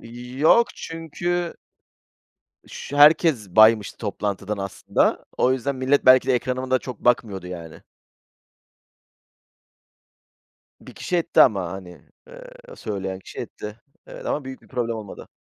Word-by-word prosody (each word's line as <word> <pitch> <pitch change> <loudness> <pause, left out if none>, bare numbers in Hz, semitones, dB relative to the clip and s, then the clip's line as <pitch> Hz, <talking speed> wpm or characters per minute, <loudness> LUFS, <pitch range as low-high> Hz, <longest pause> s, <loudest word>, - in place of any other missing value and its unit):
İii, 125 +2 -10
yok 230 +10 +5
çünkü 170 +2 -4 1.1
şü 145 - -7
herkes 145 - +5
baymıştı 110 0 +4
toplantıdan 100 -1 -4
aslında. 95 -1 -1
O 130 - +3
yüzden 130 +1 -2
millet 130 +2 +1
belki 130 0 +6
de 130 - +4
ekranıma 130 +1 -2
da 130 - +3
çok 125 -3 -9
bakmıyordu 105 -7 0
yani. 85 -3 -9 3.0
1 - - -14
kişi 180 - -2
etti 170 0 +2
ama, 95 -7 +4
hani, 90 -3 -10 0.3
eee, - - -12 0.3
söyleyen 95 -3 -5
kişi - - -13
etti. 105 +2 -8 0.3
Evet - - -10
ama 145 - -2
büyük 130 0 -9
bir - - -21
problem 120 -3 -2
olmadı. 105 -3 -10
120 Hz, 130 wpm, -23 LUFS, 100-140 Hz, 3.0 s, belki